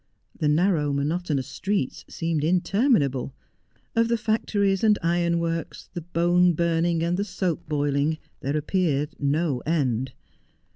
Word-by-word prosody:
The 155 - -1
narrow, 155 -2 +2
monotonous 145 0 -1
streets 160 +1 -2
seemed 165 -3 -2
inter 185 - +1
minable; 140 - +2 0.6
of 230 0 +3
the 235 0 +1
factories 205 -3 0
and 210 -2 +5
ironworks, 170 -1 -1
the 175 - -4
bone 175 +1 +3
burning 165 0 +1
and 175 +1 0
the 200 - 0
soap 180 -7 -3
boiling, 145 +1 +1 0.2
there 140 +3 -1
appeared 150 -2 0
no 145 -1 0
end. 130 -5 -1
165 Hz, 130 wpm, -25 LUFS, 145-180 Hz, 0.6 s, and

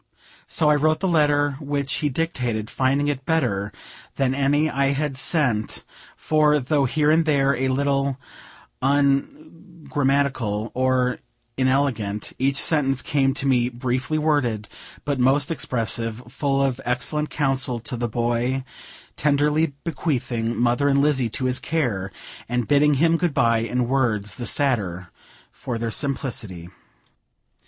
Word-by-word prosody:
So 155 - +1
I 150 - +6
wrote 155 +2 +2
the 190 - 0
letter 145 -4 +2
which 140 -2 -2
he 150 - 0
dictated, 125 -8 -2
finding 135 +2 +1
it 140 -2 -2
better 115 -11 0 0.4
than 135 -1 +1
any 140 +3 +2
I 140 -1 +1
had 145 -1 -2
sent; 130 -6 0 0.3
for, 150 -1 +3
though 140 +1 +1
here 150 +3 +2
and 165 +1 +4
there 140 -3 +2
a 130 +2 -1
little 140 0 0 0.6
ungrammatical 140 - -1
or 130 -1 +1 0.4
inelegant, 130 -6 0
each 135 +1 +1
sentence 135 -3 +1
came 135 -2 +1
to 140 - -3
me 125 -3 +2
briefly 130 +4 -2
worded, 145 -9 0 0.4
but 145 -2 -1
most 135 +5 +2
expressive; 115 -5 -2
full 140 -1 0
of 135 -1 -1
excellent 150 +5 0
counsel 135 -3 -1
to 125 - -4
the 120 0 -2
boy, 120 +3 -1 0.5
tenderly 150 +1 +1
bequeathing 125 -7 -2
"mother 120 +4 +2
and 140 0 +3
Lizzie" 135 -5 +2
to 130 +4 -3
his 130 0 +1
care, 115 -12 -2 0.4
and 125 -1 -1
bidding 145 0 +4
him 165 +4 +3
good 170 -4 -1
bye 115 -1 +3
in 120 +2 -1
words 115 -6 0
the 120 +1 -6
sadder 95 - 0 0.4
for 120 -2 -5
their 115 0 -3
simplicity. 115 - -3
135 Hz, 135 wpm, -23 LUFS, 120-145 Hz, 0.6 s, I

